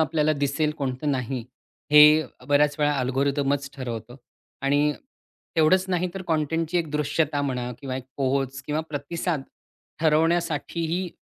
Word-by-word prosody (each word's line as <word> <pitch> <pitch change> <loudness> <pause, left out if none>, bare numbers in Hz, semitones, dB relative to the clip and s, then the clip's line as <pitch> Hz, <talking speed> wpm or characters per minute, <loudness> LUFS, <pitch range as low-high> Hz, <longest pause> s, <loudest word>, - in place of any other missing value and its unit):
आपल्याला 155 -1 +2
दिसेल 145 +1 0
कोणतं 135 +1 -2
नाही 130 -2 -2 0.5
हे 150 +1 +9
अ, 130 - -16
बऱ्याचवेळा 145 +1 +3
अल्गोरिदमच 140 +2 0
ठरवतं 120 -2 -6 0.5
आणि 145 +2 +2 0.6
तेवढंच 165 +4 +4
नाही 180 0 0
तर 195 - -5
कॉन्टेंटची 165 +1 0
एक 165 -3 -3
दृश्यता 150 0 0
म्हणा 125 -3 -2
किंवा 135 -3 -4
एक 130 - -7
पोहोच 135 -1 -1
किंवा 150 +1 0
प्रतिसाद 155 +1 -3 0.6
ठरवण्यासाठीही 165 +2 +1
145 Hz, 125 wpm, -25 LUFS, 135-160 Hz, 0.6 s, हे